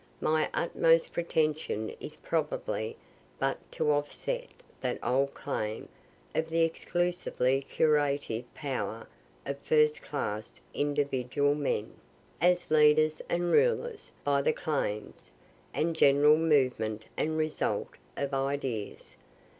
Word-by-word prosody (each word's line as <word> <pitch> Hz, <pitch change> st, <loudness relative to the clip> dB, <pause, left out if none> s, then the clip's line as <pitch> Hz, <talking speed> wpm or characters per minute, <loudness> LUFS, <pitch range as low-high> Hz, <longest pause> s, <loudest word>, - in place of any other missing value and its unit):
My 155 Hz, 0 st, +1 dB
utmost 165 Hz, -1 st, +2 dB
pretension 155 Hz, -9 st, 0 dB
is -, -, -8 dB
probably -, -, -2 dB, 0.4 s
but -, -, 0 dB
to 150 Hz, -, +1 dB
offset 150 Hz, -, -2 dB, 0.3 s
that -, -, -2 dB
old 135 Hz, +2 st, +1 dB
claim 110 Hz, +1 st, -4 dB, 0.4 s
of 160 Hz, 0 st, -1 dB
the 165 Hz, +1 st, +1 dB
exclusively 165 Hz, -5 st, 0 dB
curative 140 Hz, -5 st, 0 dB
power 115 Hz, -6 st, -4 dB, 0.4 s
of 140 Hz, 0 st, -4 dB
first 150 Hz, 0 st, +3 dB
class 110 Hz, -7 st, -4 dB
individual 145 Hz, -1 st, +1 dB
men, 140 Hz, -7 st, -2 dB, 0.5 s
as 180 Hz, 0 st, +2 dB
leaders 155 Hz, 0 st, +5 dB
and 175 Hz, 0 st, 0 dB
rulers, 475 Hz, -1 st, +2 dB
by 140 Hz, -1 st, +2 dB
the 155 Hz, -, +2 dB
claims, 135 Hz, -10 st, -3 dB, 0.4 s
and 165 Hz, +1 st, 0 dB
general 145 Hz, 0 st, +6 dB
movement 130 Hz, -9 st, +1 dB
and 155 Hz, +1 st, -1 dB
result, 155 Hz, -1 st, -1 dB, 0.3 s
of 140 Hz, 0 st, -2 dB
ideas. 135 Hz, -5 st, -3 dB
145 Hz, 105 wpm, -30 LUFS, 135-160 Hz, 0.5 s, general